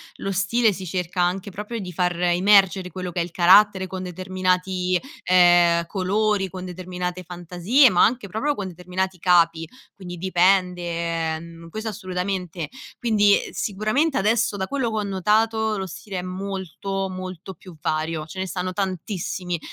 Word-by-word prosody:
lo 195 - -4
stile 220 +4 +2
si 185 0 -6
cerca 180 0 -2
anche 185 +3 -1
proprio 210 +4 -5
di 180 - -6
far 180 0 0
emergere 185 +1 +4
quello 180 0 -5
che 175 - -3
è - - +2
il 175 - -11
carattere, 190 +2 +5
con 185 0 -6
determinati, 185 0 -1 0.3
ehm, 175 -2 +5
colori, 200 +1 0
con 185 0 -8
determinate 180 0 -5
fantasie, 180 - +3
ma 175 - +5
anche 230 -3 -1
proprio 280 +9 -1
con 195 -5 -4
determinati 180 +1 -4
capi, 165 -2 +3 0.3
quindi 180 -2 -8
dipende, 175 -3 +1
mhmm, 165 0 -11
questo 220 +6 -5
assolutamente. 185 -4 -4 0.3
Quindi, 210 -4 +4
uhm, - - -9
sicuramente 215 +9 0
adesso 220 +1 +2
da 190 -1 -3
quello 265 -2 -1
che 220 - -4
ho - - -1
notato, 215 +3 +1
lo 190 - -3
stile 190 +1 -7
è - - -3
molto, 190 +1 -4
molto 185 0 -7
più 180 +1 -14
vario, 155 +1 -2
ce 165 +4 -9
ne 190 - -2
stanno 180 +2 -3
tantissimi. 185 -2 -3
185 Hz, 160 wpm, -23 LUFS, 175-200 Hz, 0.3 s, carattere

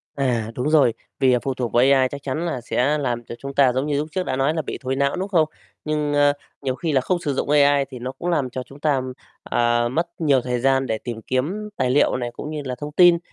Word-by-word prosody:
À, 120 -5 0
đúng 125 +4 -1
rồi, 145 -7 +4 0.3
vì, 130 -2 +4
à, 125 - +3
phụ 135 - -1
thuộc 125 -2 -3
vào 120 - +5
AI 135 -1 +4
chắc 140 -1 -7
chắn 150 +5 -2
là 145 -7 -3
sẽ 130 +5 +1
làm 120 -5 -2
cho 120 - -7
chúng 140 0 -6
ta 135 -3 +4
giống 130 +2 0
như 145 -1 0
lúc 150 +2 -1
trước 185 +2 -1
đã 130 - -1
nói 135 +3 +1
là 160 - -1
bị 145 - -5
thối 130 +1 -1
não, 140 0 +1
đúng 185 +2 -3
không? 170 -5 +4 0.4
Nhưng, 150 -1 -1
a, 145 0 +4 0.3
nhiều 130 -2 -1
khi 160 +3 -2
là 135 -3 +3
không 175 +7 0
sử 145 -4 -2
dụng 135 - -2
AI 145 -1 +4
thì 130 -3 -8
nó 125 +2 -4
cũng 150 +6 -5
làm 145 -7 0
cho 130 +1 -5
chúng 135 +3 -15
ta, 145 -3 +1 0.4
ờ, 120 0 +1
mất 165 +6 0
nhiều 140 -5 +3
thời 125 0 -2
gian 135 +1 +2
để 110 -3 -1
tìm 115 0 -6
kiếm 170 - -2
tài 125 - +1
liệu 145 - +3
này 120 -1 -3
cũng 150 - -7
như 155 -1 -4
là 130 -1 -3
thông 145 0 -5
tin, 175 +2 +6
135 Hz, 275 wpm, -22 LUFS, 125-150 Hz, 0.4 s, tin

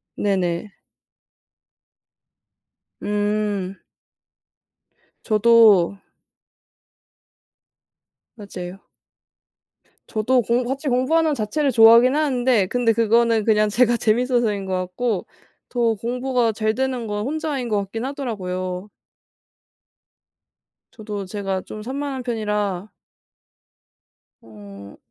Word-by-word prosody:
네네. 185 -1 -1 2.3
음. 205 -2 -2 1.4
저도 215 -4 +4 2.4
맞아요. 190 -3 -8 1.3
저도 245 +4 +1
공부 240 +2 0
같이 275 +3 -3
공부하는 305 +6 +2
자체를 275 +6 -1
좋아하기는 235 +4 +6
하는데 255 -7 +2
근데 240 +1 +1
그거는 230 0 +2
그냥 215 -1 +3
제가 240 +2 +3
재밌어서 235 0 +1
인 200 -1 -5
것 190 - -4
같고 185 +4 -2 0.4
더 235 -2 +1
공부가 245 +2 -1
잘 215 0 -1
되는 260 -2 -2
건 210 0 -3
혼자인 290 -3 -3
것 210 - +1
같기는 225 +6 -3
하더라고요. 185 -8 -5 2.0
저도 210 -3 -6
제가 195 -1 -3
좀 215 - -9
산만한 270 +1 -4
편이라 210 -5 -2 1.5
어. 100 -2 -13
220 Hz, 185 characters per minute, -21 LUFS, 200-245 Hz, 2.4 s, 좋아하기는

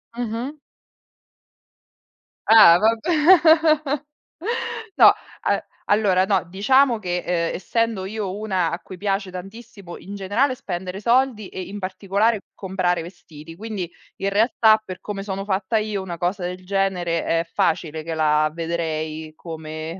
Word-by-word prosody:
Mh-mh. 245 +5 -4 1.9
Ah, 215 -7 +9
vabbè. 220 +1 +2 1.9
No, - - +8 0.3
a - - 0 0.2
allora 200 -3 +3
no, 195 -3 +1
diciamo 235 +7 +3
che, 180 -3 -2
uhm, 170 -2 0
essendo 225 +1 -1
io 200 -1 -4
una 190 -6 -1
a 170 - -3
cui 185 - -11
piace 195 0 -1
tantissimo 195 0 -10
in 200 +2 -9
generale 220 +8 0
spendere 185 -2 -6
soldi 235 -3 +1
e 185 - -6
in 205 +2 -7
particolare 200 +4 0 0.2
comprare 185 -3 -1
vestiti. 165 -2 -12
Quindi, 205 -4 -5 0.3
in 195 - +1
realtà, 220 +1 +4
per 185 -2 -8
come 205 -2 -5
sono 195 -1 -4
fatta 195 +2 -1
io, 210 -2 -3
una 175 -2 -6
cosa 180 +3 -2
del 180 +1 -5
genere 180 -4 0
è 165 0 +1
facile 160 -1 -1
che 165 +1 -4
la 155 -1 +2
vedrei 160 -2 -3
come 160 +1 -7
190 Hz, 130 wpm, -22 LUFS, 170-215 Hz, 1.9 s, Ah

